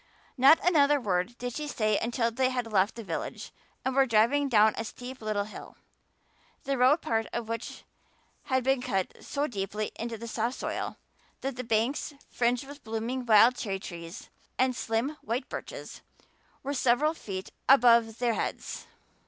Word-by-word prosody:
Not 280 +4 +7
another 295 -4 +5
word 205 0 -1
did 245 0 -4
she 300 +3 -4
say 215 -6 +1
until 235 0 0
they 255 +2 +1
had 245 -3 -3
left 195 +1 +3
the 230 - -7
village 165 -5 -5 0.3
and 260 - 0
were 270 -1 +4
driving 235 +6 +3
down 215 -2 +5
a - - -3
steep 250 +3 -8
little 215 -2 -1
hill, 210 - -11 0.9
the 275 - -1
road 265 +5 +4
part 225 -1 0
of 235 -2 -3
which 230 0 -5 0.6
had 260 -1 +1
been 265 0 +2
cut 195 -7 -1
so 285 0 -1
deeply 210 -3 -3
into 230 0 -4
the 235 +2 -8
soft 230 +3 -2
soil, - - -4 0.4
that 270 -1 -3
the 255 - -4
banks, 235 +6 0 0.2
fringed 245 +2 +1
with 285 +1 -11
blooming 230 +3 -3
wild 225 +3 +7
cherry 195 -5 -3
trees 170 -1 -9 0.3
and 255 -1 +2
slim 235 +6 -1
white 235 +5 -3
birches, - - -7 0.6
were 280 +1 -2
several 270 +4 +2
feet 190 -10 -7 0.2
above 235 -4 +6
their 240 -1 +1
heads. - - -4
240 Hz, 165 wpm, -28 LUFS, 220-265 Hz, 0.9 s, Not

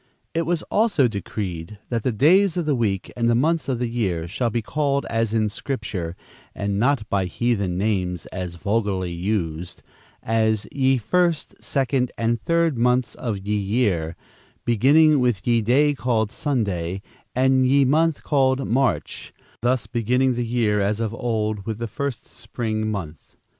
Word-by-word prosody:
It 165 -1 -1
was 170 -2 0
also 210 - +2
decreed 100 -3 -5
that 115 -2 -1
the 130 - 0
days 175 - +4
of 175 - 0
the 150 - +2
week 105 -6 -1
and 115 -1 +1
the 120 - +3
months 160 +5 +1
of 130 - 0
the 125 0 -1
year 95 -9 -1
"shall 115 +7 -1
be 115 0 -2
called 140 +1 0
as 115 -1 0
in 110 -1 +2
Scripture, 105 -7 -4 0.4
and 100 0 -1
not 125 -2 +1
by 100 -3 0
heathen 100 -2 -1
names 95 -4 -1
(as 90 -2 -5
are - - -12
vulgarly 100 -2 -1
used), 85 -2 -3 0.4
as 110 -1 +1
ye 135 -1 +2
First, 170 - 0
Second 130 -2 0
and 115 0 0
Third 165 -6 +1
months 125 0 +2
of 115 -5 -3
ye 100 +2 -2
year, 100 -6 0 0.5
beginning 145 +6 +5
with 120 -7 0
ye 120 -1 +3
day 140 +7 +3
called 115 -5 0
Sunday, 100 - -2 0.3
and 130 0 +3
ye 140 +1 +4
month 160 +3 +2
called 135 -2 +2
March," 130 +3 -1 0.3
thus 125 +1 +1
beginning 125 +3 +1
the 120 -1 -2
year, 110 -3 +1
as 105 +2 0
of 115 -1 -2
old, 110 -3 -2
with 110 -2 -2
the 115 - -3
first 130 +3 -4
spring 110 -2 -4
month. 85 -7 -7
115 Hz, 165 wpm, -23 LUFS, 100-130 Hz, 0.5 s, beginning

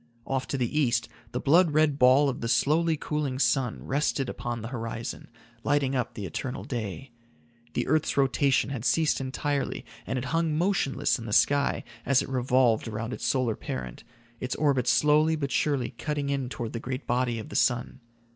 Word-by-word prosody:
Off 135 -1 -2
to 140 - -2
the 130 +4 0
east 120 -5 +1 0.2
the - - -2
blood 170 +5 +4
red 155 -2 +3
ball 130 +3 +6
of 135 - -3
the 115 - -2
slowly 160 +6 +2
cooling 145 -3 -2
sun 130 -3 +1
rested 140 -1 0
upon 120 -2 -4
the 115 - -5
horizon, 115 -2 -5 0.3
lighting 140 -2 +1
up 125 -2 -2
the 105 - -5
eternal 125 +9 -4
day. 120 +1 -5 0.6
The - - -1
earth's 155 +1 +1
rotation 135 0 +2
had 125 -5 -4
ceased 155 +1 +2
entirely, 140 +1 -2 0.2
and 130 - -1
it 125 - -3
hung 165 -2 +1
motionless 175 -8 +1
in 115 - -7
the - - -5
sky 140 +5 +3 0.2
as 140 0 +3
it - - -8
revolved 125 -3 +2
around 115 +2 -4
its - - -3
solar 125 -5 +1
parent, 65 -2 -6 0.4
its 125 - -3
orbit 140 -5 +1
slowly 150 +6 +4
but 140 -3 -3
surely 140 -5 0
cutting 145 -2 -2
in 135 -3 -2
toward 120 -3 -5
the 115 - -3
great 130 +3 -5
body 120 -1 0
of 110 - -7
the - - -8
sun. 120 +1 +1
130 Hz, 185 wpm, -27 LUFS, 120-145 Hz, 0.6 s, ball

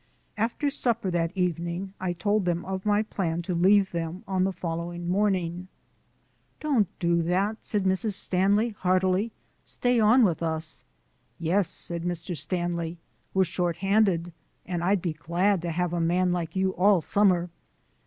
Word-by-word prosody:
After 235 +6 -1
supper 230 -8 -1
that 165 -1 0
evening 175 +1 -2
I 185 -1 -1
told 205 +3 0
them 175 -1 -1
of 190 +1 -4
my 205 +1 +3
plan 175 -5 -2
to 180 - -3
leave 190 +3 +4
them 170 +2 -4
on 190 -1 +1
the 195 - 0
following 170 0 -4
morning. 185 -2 0 0.9
"Don't 270 -10 +2
do 170 -1 +2
that," 190 +6 0
said 210 -3 -1
Mrs. 190 +3 +1
Stanley 200 +4 +2
heartily; 185 +1 +1 0.3
"stay 245 -1 0
on 225 +4 +5
with 175 -7 +1
us." 160 -1 -3 0.5
"Yes," 175 +3 +1
said 170 -1 -3
Mr. 175 0 -3
Stanley, 170 +1 -3 0.4
"we're 190 - +5
shorthanded, 180 0 +1 0.3
and 175 -2 -3
I'd 190 0 +2
be 170 -4 -1
glad 175 +5 0
to 175 - -3
have 175 +1 -1
a 170 - 0
man 180 +2 +2
like 170 -1 -3
you 190 0 +1
all 190 0 +3
summer. 180 -1 +2
180 Hz, 155 wpm, -26 LUFS, 170-200 Hz, 0.9 s, on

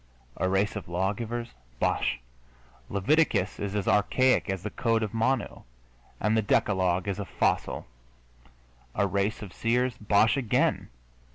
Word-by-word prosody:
A 95 - 0
race 95 +3 +1
of 105 - -6
lawgivers? 110 +6 -2 0.3
Bosh! - - 0 0.7
Leviticus 105 - +1
is 100 0 -3
as 100 -3 -1
archaic 130 +4 +3
as 95 -2 -3
the 105 - -4
Code 115 -2 +1
of 105 - -4
Manu, 125 +3 0 0.6
and 105 +2 +1
the 110 - +3
Decalogue 95 -3 +1
is 100 0 -2
a 100 - -3
fossil. - - 0 1.1
A 100 - +2
race 100 +2 -1
of 95 - -9
seers? 125 +2 +1
Bosh 105 +4 +3
again! 125 -6 +1
105 Hz, 135 wpm, -27 LUFS, 95-115 Hz, 1.1 s, archaic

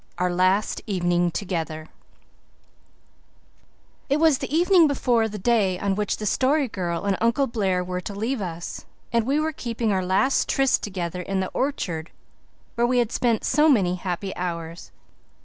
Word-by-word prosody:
OUR 180 0 0
LAST 185 +3 +1
EVENING 175 -3 +1
TOGETHER 165 -4 -4 2.2
IT 280 - +3
was 315 -4 +4
the - - -5
evening 345 +1 +5
before 240 -5 +1
the 210 - -6
day 205 -3 +2
on 200 +1 -1
which 210 +1 -1
the 215 - -5
Story 270 +6 +2
Girl 175 -5 -3
and 200 -1 +2
Uncle 235 +5 +2
Blair 195 -7 0
were 180 0 -4
to 200 +2 -7
leave 225 +4 -2
us, 170 -2 -6 0.3
and 230 0 +1
we 285 +3 +2
were 315 +1 -1
keeping 230 -4 -2
our 190 -1 0
last 190 +9 +1
tryst 270 -1 +2
together 180 -3 -4
in 195 +2 -2
the 185 - -2
orchard 175 - -2 0.6
where 235 +1 +1
we 250 0 +1
had 240 -2 +1
spent 235 -3 +1
so 300 +4 +3
many 195 -10 +3
happy 185 +1 -4
hours. 170 -1 -5
200 Hz, 165 wpm, -24 LUFS, 180-250 Hz, 2.2 s, evening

